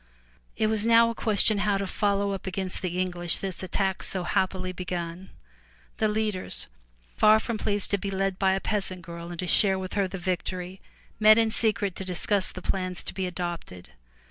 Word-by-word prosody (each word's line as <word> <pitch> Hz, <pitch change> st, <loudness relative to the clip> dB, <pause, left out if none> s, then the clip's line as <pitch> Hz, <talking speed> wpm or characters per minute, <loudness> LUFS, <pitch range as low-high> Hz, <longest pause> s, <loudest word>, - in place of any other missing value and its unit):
It 220 Hz, -, +2 dB
was 215 Hz, -1 st, +2 dB
now 230 Hz, 0 st, +6 dB
a -, -, -5 dB
question 215 Hz, -1 st, +2 dB
how 205 Hz, -1 st, +2 dB
to 195 Hz, -, -2 dB
follow 200 Hz, +1 st, 0 dB
up 195 Hz, -1 st, -5 dB
against 190 Hz, 0 st, -2 dB
the 180 Hz, -1 st, -2 dB
English 175 Hz, -2 st, 0 dB
this 190 Hz, -2 st, -2 dB
attack 190 Hz, 0 st, 0 dB
so 185 Hz, -2 st, -1 dB
happily 185 Hz, +1 st, 0 dB
begun. 180 Hz, 0 st, -5 dB, 0.7 s
The 220 Hz, -, +2 dB
leaders, 210 Hz, -3 st, -2 dB, 0.5 s
far 215 Hz, 0 st, +6 dB
from 225 Hz, -1 st, -3 dB
pleased 205 Hz, -2 st, 0 dB
to 200 Hz, -, +2 dB
be 200 Hz, -, -3 dB
led 195 Hz, -1 st, -1 dB
by 190 Hz, -1 st, +3 dB
a 190 Hz, -, 0 dB
peasant 190 Hz, -4 st, -3 dB
girl 170 Hz, 0 st, -8 dB
and 175 Hz, -, -7 dB
to 180 Hz, -, -3 dB
share 190 Hz, +2 st, +5 dB
with 185 Hz, -1 st, -5 dB
her 200 Hz, -2 st, +1 dB
the 195 Hz, -, -6 dB
victory, 185 Hz, 0 st, -4 dB, 0.4 s
met 215 Hz, 0 st, +7 dB
in 225 Hz, -1 st, +3 dB
secret 210 Hz, -4 st, 0 dB
to -, -, -4 dB
discuss 185 Hz, +2 st, 0 dB
the 185 Hz, -, -9 dB
plans 185 Hz, -2 st, -2 dB
to -, -, -5 dB
be 190 Hz, -1 st, -2 dB
adopted. 175 Hz, -, -6 dB
190 Hz, 195 wpm, -27 LUFS, 180-205 Hz, 0.7 s, met